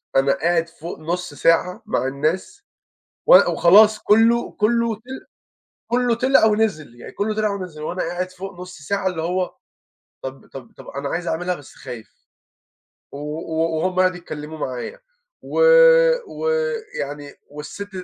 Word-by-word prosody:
أنا 135 Hz, +1 st, +4 dB
قاعد 165 Hz, +3 st, 0 dB
فوق 165 Hz, +1 st, -9 dB
نص 175 Hz, 0 st, -4 dB
ساعة 165 Hz, +7 st, +1 dB
مع 210 Hz, -11 st, -1 dB
الناس، 160 Hz, -, -2 dB, 0.6 s
و -, -, +9 dB, 0.2 s
وخلاص 210 Hz, +5 st, +6 dB
كُلّه، 225 Hz, +3 st, +3 dB
كُلّه 235 Hz, +1 st, +1 dB
ط -, -, -22 dB, 0.9 s
كُلّه 245 Hz, -1 st, +2 dB
طلع 260 Hz, 0 st, +4 dB
ونزِل، 210 Hz, -, 0 dB
يعني -, -, -10 dB
كُلّه 215 Hz, +1 st, -2 dB
طلع 215 Hz, -1 st, +1 dB
ونزِل، 185 Hz, -6 st, -6 dB
وأنا 180 Hz, +4 st, -3 dB
قاعد 180 Hz, +2 st, -3 dB
فوق 185 Hz, 0 st, -9 dB
نص 180 Hz, 0 st, -10 dB
ساعة 190 Hz, +7 st, -2 dB
اللي 180 Hz, -3 st, -2 dB
هو 180 Hz, +2 st, -2 dB, 0.7 s
طب 130 Hz, 0 st, -8 dB
طب 130 Hz, -4 st, -10 dB
طب -, -, -13 dB
أنا 140 Hz, +1 st, -5 dB
عايز 175 Hz, +4 st, -3 dB
أعملها 180 Hz, +3 st, -1 dB
بس 145 Hz, -5 st, -13 dB
خايف، 120 Hz, -5 st, -9 dB, 1.0 s
و -, -, -8 dB
و 160 Hz, +2 st, -2 dB
وهُم 185 Hz, +3 st, -1 dB
قعدوا 185 Hz, -1 st, +2 dB
يتكلموا 155 Hz, -2 st, -8 dB
معايا، 130 Hz, -, -5 dB, 0.4 s
و -, -, -4 dB, 0.7 s
ويعني 445 Hz, -, -3 dB, 0.2 s
والست 150 Hz, +8 st, -8 dB
180 Hz, 145 wpm, -21 LUFS, 150-210 Hz, 1.0 s, و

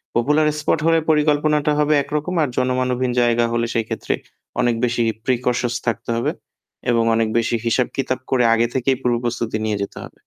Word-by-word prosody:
Popular 150 Hz, +6 st, +3 dB
spot 150 Hz, +1 st, +1 dB
হলে 165 Hz, 0 st, +4 dB
পরিকল্পনাটা 150 Hz, 0 st, +2 dB
হবে 150 Hz, 0 st, +3 dB
একরকম 150 Hz, +6 st, -3 dB
আর 140 Hz, -, -1 dB
জনমানবহীন 125 Hz, 0 st, 0 dB
জায়গা 120 Hz, 0 st, +3 dB
হলে 115 Hz, 0 st, +1 dB
সেইক্ষেত্রে 115 Hz, -2 st, -2 dB, 0.5 s
অনেক 120 Hz, -1 st, +2 dB
বেশি 120 Hz, 0 st, -1 dB, 0.2 s
প্রিকশস 125 Hz, -1 st, 0 dB
থাকতে 115 Hz, -, -2 dB
হবে। 115 Hz, -, 0 dB, 0.6 s
এবং 115 Hz, -1 st, +2 dB
অনেক 115 Hz, 0 st, +2 dB
বেশি 115 Hz, 0 st, +1 dB
হিসাব 120 Hz, +2 st, +2 dB
কিতাব 130 Hz, -1 st, -1 dB
করে 125 Hz, -2 st, +3 dB
আগে 115 Hz, +1 st, +2 dB
থেকেই 130 Hz, 0 st, +1 dB
পূর্বপ্রস্তুতি 120 Hz, -2 st, -1 dB
নিয়ে 105 Hz, -2 st, -1 dB
যেতে -, -, -8 dB
হবে। -, -, -12 dB
125 Hz, 165 wpm, -20 LUFS, 120-145 Hz, 0.6 s, হলে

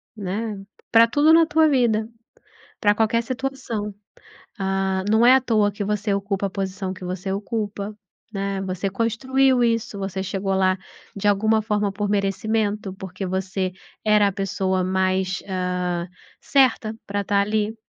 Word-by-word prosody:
né, 210 Hz, +2 st, -3 dB, 0.3 s
pra 230 Hz, 0 st, +7 dB
tudo 295 Hz, +6 st, +4 dB
na 330 Hz, 0 st, +7 dB
tua 315 Hz, 0 st, +4 dB
vida, 230 Hz, -6 st, +2 dB, 0.7 s
pra 205 Hz, 0 st, +3 dB
qualquer 225 Hz, +1 st, +2 dB
situação. 250 Hz, -5 st, -4 dB, 0.6 s
Ah, 190 Hz, -1 st, 0 dB
não 220 Hz, +2 st, +5 dB
é 250 Hz, -, +8 dB
à 265 Hz, -, +4 dB
toa 215 Hz, -4 st, +2 dB
que 205 Hz, +1 st, -4 dB
você 205 Hz, 0 st, -1 dB
ocupa 200 Hz, 0 st, -1 dB
a -, -, -7 dB
posição 190 Hz, -1 st, -4 dB
que 185 Hz, -, -11 dB
você 185 Hz, +1 st, -4 dB
ocupa, 205 Hz, 0 st, -3 dB, 0.4 s
né? 195 Hz, 0 st, -2 dB
Você 190 Hz, 0 st, -2 dB
construiu 250 Hz, +5 st, +2 dB
isso, 230 Hz, -2 st, 0 dB
você 195 Hz, 0 st, -3 dB
chegou 195 Hz, +1 st, -2 dB
lá, 185 Hz, 0 st, +2 dB, 0.4 s
de 200 Hz, +1 st, -1 dB
alguma 220 Hz, +2 st, +3 dB
forma, 210 Hz, -2 st, 0 dB
por 205 Hz, +1 st, -3 dB
merecimento, 205 Hz, 0 st, 0 dB
porque 190 Hz, 0 st, -6 dB
você 190 Hz, 0 st, -2 dB, 0.3 s
era 210 Hz, -1 st, +5 dB
a -, -, 0 dB
pessoa 190 Hz, -1 st, -1 dB
mais, 185 Hz, 0 st, 0 dB
ah, 180 Hz, -2 st, -2 dB, 0.3 s
certa 250 Hz, -5 st, +2 dB
pra 200 Hz, 0 st, -2 dB
tá 200 Hz, 0 st, +1 dB
ali. 210 Hz, +1 st, 0 dB
205 Hz, 150 wpm, -23 LUFS, 190-220 Hz, 0.7 s, é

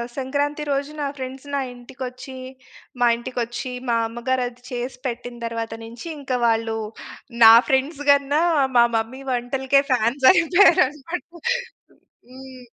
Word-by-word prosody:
సంక్రాంతి 285 Hz, +3 st, -2 dB
రోజు 280 Hz, +1 st, -1 dB
నా 285 Hz, -, -1 dB
ఫ్రెండ్స్ 265 Hz, +1 st, -7 dB
నా -, -, +1 dB
ఇంటికొచ్చి, 255 Hz, +1 st, -9 dB, 0.7 s
మా 240 Hz, -, +5 dB
ఇంటికొచ్చి, 240 Hz, 0 st, -4 dB, 0.2 s
మా 230 Hz, -, +2 dB
అమ్మగారు 245 Hz, +2 st, -2 dB
అది 245 Hz, 0 st, -22 dB
చేసి 245 Hz, +1 st, -4 dB
పెట్టిన 245 Hz, 0 st, -6 dB
తరువాత 230 Hz, -1 st, -4 dB
నుంచి, 235 Hz, +7 st, -10 dB
ఇంకా 265 Hz, -3 st, -2 dB
వాళ్ళు 225 Hz, 0 st, 0 dB, 0.7 s
నా 225 Hz, 0 st, +11 dB, 0.2 s
ఫ్రెండ్స్ 275 Hz, +3 st, 0 dB
గన్నా, 285 Hz, +2 st, +2 dB, 0.4 s
మా 235 Hz, -, +8 dB
మమ్మీ 230 Hz, +4 st, -4 dB
వంటలకే 265 Hz, +3 st, +1 dB
ఫ్యాన్స్ 250 Hz, +2 st, +1 dB
అయిపోయారు 350 Hz, +1 st, +5 dB
అన్నమాట. 300 Hz, +5 st, -7 dB, 1.1 s
హ్మ్. 260 Hz, -1 st, -12 dB
260 Hz, 125 wpm, -22 LUFS, 240-275 Hz, 1.1 s, నా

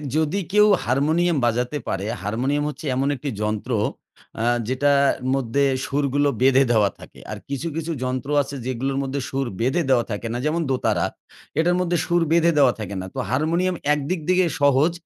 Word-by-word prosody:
যদি 160 Hz, +5 st, +1 dB
কেউ 210 Hz, 0 st, +6 dB, 0.2 s
হারমোনিয়াম 155 Hz, +6 st, +2 dB
বাজাতে 125 Hz, +4 st, 0 dB
পারে, 95 Hz, +1 st, -2 dB, 0.2 s
হারমোনিয়াম 130 Hz, +8 st, -1 dB
হচ্ছে 150 Hz, -, -8 dB
এমন 135 Hz, +2 st, 0 dB
একটি 140 Hz, +2 st, -5 dB
যন্ত্র 105 Hz, +3 st, -2 dB, 0.7 s
আ -, -, 0 dB, 0.2 s
যেটা 130 Hz, +3 st, +2 dB, 0.4 s
মধ্যে 135 Hz, +1 st, 0 dB, 0.2 s
সুরগুলো 145 Hz, 0 st, +1 dB
বেঁধে 135 Hz, +1 st, +5 dB
দেওয়া 105 Hz, -4 st, +4 dB
থাকে। -, -, -14 dB
আর -, -, -4 dB
কিছু, 140 Hz, +4 st, -3 dB
কিছু 165 Hz, +1 st, -3 dB
যন্ত্র 130 Hz, +1 st, -3 dB
আছে 140 Hz, 0 st, -6 dB
যেগুলোর 130 Hz, +2 st, -2 dB
মধ্যে 135 Hz, +1 st, -3 dB
সুর 135 Hz, -1 st, -2 dB
বেঁধে 135 Hz, +9 st, +1 dB
দেওয়া 125 Hz, -3 st, +3 dB
থাকে 105 Hz, +3 st, -4 dB
না, -, -, -2 dB
যেমন 160 Hz, +3 st, 0 dB
দোতারা। 130 Hz, -1 st, +1 dB, 0.5 s
এটার 175 Hz, +2 st, +3 dB
মধ্যে 175 Hz, -1 st, 0 dB
সুর 175 Hz, 0 st, +2 dB
বেঁধে 170 Hz, 0 st, +4 dB
দেওয়া 135 Hz, -4 st, +5 dB
থাকে 100 Hz, -2 st, -5 dB
না। -, -, -6 dB
তো -, -, -4 dB
হারমোনিয়াম 170 Hz, +6 st, +1 dB, 0.2 s
একদিক 150 Hz, +5 st, -2 dB
দিয়ে 185 Hz, 0 st, +4 dB, 0.2 s
সহজ, 140 Hz, +3 st, +4 dB
140 Hz, 170 wpm, -22 LUFS, 125-160 Hz, 0.7 s, কেউ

